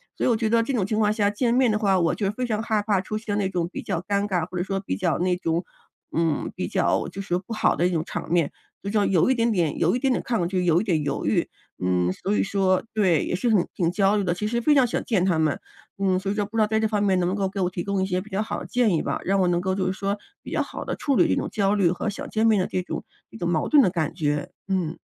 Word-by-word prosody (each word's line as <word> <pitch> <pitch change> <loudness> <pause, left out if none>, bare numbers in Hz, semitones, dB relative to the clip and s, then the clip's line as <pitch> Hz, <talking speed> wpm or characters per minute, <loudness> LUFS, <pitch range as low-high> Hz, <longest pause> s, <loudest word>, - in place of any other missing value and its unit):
所 - - -4
以 - - +3
我 230 - +3
觉 220 -1 -1
得 230 0 +4
这 240 - -2
种 220 -7 +1
情 215 +2 -1
况 210 -1 +3
下 205 -2 +1
见 235 +3 0
面 250 -2 +3
的 210 - 0
话， 195 -3 +2
我 170 - +2
就 200 -2 -1
非 250 +5 -3
常 220 -2 -1
害 220 -3 0
怕 200 -3 +1
出 215 +2 -4
现 210 -2 -2
那 190 -1 0
种 175 -3 -1
比 - - -4
较 170 - -2
尴 200 0 +1
尬， 180 -4 -1
或 185 - -10
者 175 - 0
说 195 +1 -2
比 190 - -3
较 - - 0
那 180 0 +1
种， 170 0 -1 0.5
嗯， 165 -1 0
比 - - -3
较 - - +1
就 195 +1 -6
是 180 -2 -1
不 215 +5 -8
好 - - +2
的 175 - +2
一 - - -1
种 165 -2 0
场 - - -5
面。 170 -4 +2 0.3
就 200 - -3
说， 205 -1 +2
有 180 +3 +3
一 260 - +3
点 230 -1 +2
点 170 -7 0
有 175 +8 +2
一 - - 0
点 270 0 +1
点 - - 0
抗 225 -8 0
拒， 180 0 -1
有 170 +1 +4
一 - - -2
点 165 -8 0
犹 - - -2
豫。 - - +1 0.4
嗯， 90 -1 +1
所 200 - -2
以 - - +2
说 190 -2 +1
对， 185 -8 +3
也 - - -1
是 185 - -1
很 195 -5 +3
挺 170 -2 +1
焦 200 +2 +2
虑 200 - 0
的， 175 -2 +1
其 210 +4 -3
实 235 +2 0
非 295 +5 +3
常 260 -4 +4
想 - - -2
见 195 -7 +1
她 180 -4 +2
们。 155 -2 +1 0.4
嗯， 190 -2 +2
所 195 +1 -2
以 - - 0
说 205 -1 0
不 225 - -6
知 - - +3
道 - - +5
在 220 +1 0
这 220 - +2
方 210 -1 0
面， 190 -2 +2
能 175 0 +1
不 190 - -1
能 190 -1 0
给 200 - -5
我 180 - +1
提 180 -1 -4
供 200 -1 -1
一 190 - 0
些 185 -1 -1
比 210 +1 -14
较 195 - 0
好 215 -1 -3
的 - - -7
建 235 -8 +2
议 - - 0
吧， - - -2
让 195 +1 +1
我 185 - +3
能 175 0 +1
够 190 0 -1
就 190 -1 -1
是 185 - 0
说， 200 +1 -2 0.2
比 - - -10
较 - - +1
好 - - -7
地 - - -3
处 280 -2 0
理 - - +4
这 - - +2
种 - - -2
焦 200 -1 +1
虑， 185 -5 +3
和 180 +4 -2
想 205 - -6
见 220 +1 +2
面 215 -3 +4
的 185 - +1
这 185 - -2
种 - - -5 0.3
这 - - -11
种 175 - -2
矛 165 -3 0
盾 290 -4 +6
的 185 - +2
感 160 -5 -2
觉。 150 -3 -1 0.2
嗯。 180 -4 -1
195 Hz, 340 characters per minute, -24 LUFS, 180-215 Hz, 0.5 s, 盾